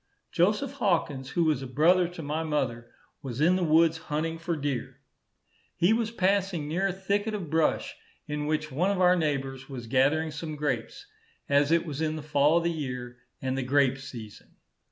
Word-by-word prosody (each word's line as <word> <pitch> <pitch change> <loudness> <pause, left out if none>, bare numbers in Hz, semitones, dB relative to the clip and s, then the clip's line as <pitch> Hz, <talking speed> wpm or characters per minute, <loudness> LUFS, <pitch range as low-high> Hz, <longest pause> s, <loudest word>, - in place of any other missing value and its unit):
Joseph 210 +10 +2
Hawkins, 145 -8 0
who 170 - +1
was 155 -4 +1
a 135 - -5
brother 170 +7 +4
to 175 -2 -8
my 150 +2 -2
mother, 130 -7 -2 0.3
was 130 -2 -6
in 170 +4 +4
the 185 - 0
woods 160 0 +4
hunting 160 +2 -2
for 165 +1 -2
deer. 140 -5 -4 0.8
He 180 +6 +3
was 225 -1 0
passing 190 -6 0
near 180 +6 0
a - - 0
thicket 200 +3 -1
of 175 -7 -6
brush, 160 -1 +1 0.3
in 150 0 -3
which 155 0 -1
one 170 +9 +1
of 200 -2 0
our 180 0 +5
neighbours 135 -5 -2
was 125 -4 -7
gathering 140 +6 +2
some 155 +1 -5
grapes, 145 - -3 0.4
as 145 +1 +3
it 170 0 +3
was 150 -2 -5
in 155 -1 0
the 155 - -6
fall 150 +1 +3
of 170 - +1
the 170 - +1
year, 125 -6 -5 0.3
and 130 0 -1
the 135 - -1
grape 135 +1 +2
season. 115 -5 -10
155 Hz, 190 wpm, -28 LUFS, 135-175 Hz, 0.8 s, our